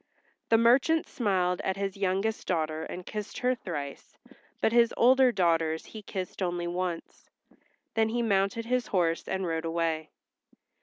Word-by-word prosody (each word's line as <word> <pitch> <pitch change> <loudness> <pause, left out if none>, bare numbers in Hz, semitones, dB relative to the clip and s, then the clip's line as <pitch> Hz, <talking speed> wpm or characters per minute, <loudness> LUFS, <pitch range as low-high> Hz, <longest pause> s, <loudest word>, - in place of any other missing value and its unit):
The 225 - +6
merchant 260 +8 +4
smiled 185 -6 0
at 190 0 -2
his 195 -1 -2
youngest 195 +3 -1
daughter 155 -3 -1
and 180 0 -7
kissed 210 -2 -6
her 250 +1 +2
thrice, 150 - -7 0.4
but - - +2
his 235 0 +4
older 255 +1 +5
daughters 165 -5 +1
he 220 - -9
kissed 190 -1 -6
only 175 -1 -1
once. 175 -1 -4 0.6
Then 220 0 +2
he 240 +1 0
mounted 200 +1 +1
his 250 0 0
horse 170 -3 0
and 190 0 -2
rode 165 -1 -2
away. 165 -2 -1
190 Hz, 150 wpm, -28 LUFS, 170-225 Hz, 0.6 s, The